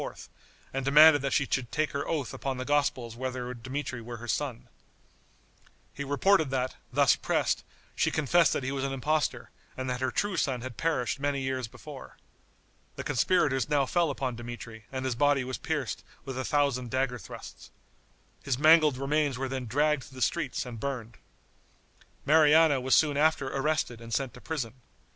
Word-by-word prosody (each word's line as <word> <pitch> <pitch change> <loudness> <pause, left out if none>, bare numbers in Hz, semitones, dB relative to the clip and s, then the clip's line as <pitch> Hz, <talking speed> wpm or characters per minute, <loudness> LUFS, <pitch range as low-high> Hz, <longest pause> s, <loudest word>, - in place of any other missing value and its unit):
and 135 0 -2
demanded 145 +2 +7
that 140 0 -1
she 140 - +2
should 125 -4 -2
take 155 0 0
her 140 - -3
oath 145 -6 -2
upon 135 0 -3
the 130 - -4
Gospels 130 -5 0
whether 125 0 -4
Dmitri 130 +1 -5
were 120 +1 -7
her 120 +1 -9
son. 125 +1 -2 1.3
He 140 - -5
reported 155 +3 +3
that, 130 -1 -1 0.2
thus - - +4
pressed, - - 0 0.3
she - - +2
confessed 160 +2 +3
that - - -2
he 135 - -2
was 135 -1 -2
an 135 0 -2
impostor, 150 +3 -1 0.3
and 130 0 -3
that 125 0 -3
her 130 - +1
true 205 +5 -1
son 130 -4 0
had 130 -1 -7
perished 150 -5 -1
many 140 0 0
years 130 -2 -2
before. - - -11 0.8
The - - -5
conspirators 140 -2 +1
now 145 -2 +3
fell 170 +3 +1
upon 130 -3 -3
Dmitri 120 -2 -8
and 130 -1 -4
his 130 - 0
body 145 +1 +2
was 130 0 -5
pierced 150 -6 -3 0.2
with 135 -2 -5
a 130 - -2
thousand 140 -4 0
dagger 130 0 -1
thrusts. - - -11 0.7
His 130 -3 -1
mangled 155 -2 +6
remains 140 0 0
were 135 +1 -2
then 130 -2 -4
dragged 145 +3 +1
through 135 - -15
the 130 - -8
streets 145 -8 -1
and 120 -3 -7
burned. 120 -4 -5 1.1
Mariana 155 -2 +5
was 130 +1 +3
soon 150 -3 +3
after 150 -3 +2
arrested 135 -4 -1
and 115 0 -10
sent 130 -1 -1
to 125 - -13
prison. 135 -8 -4
135 Hz, 175 wpm, -29 LUFS, 125-145 Hz, 1.3 s, demanded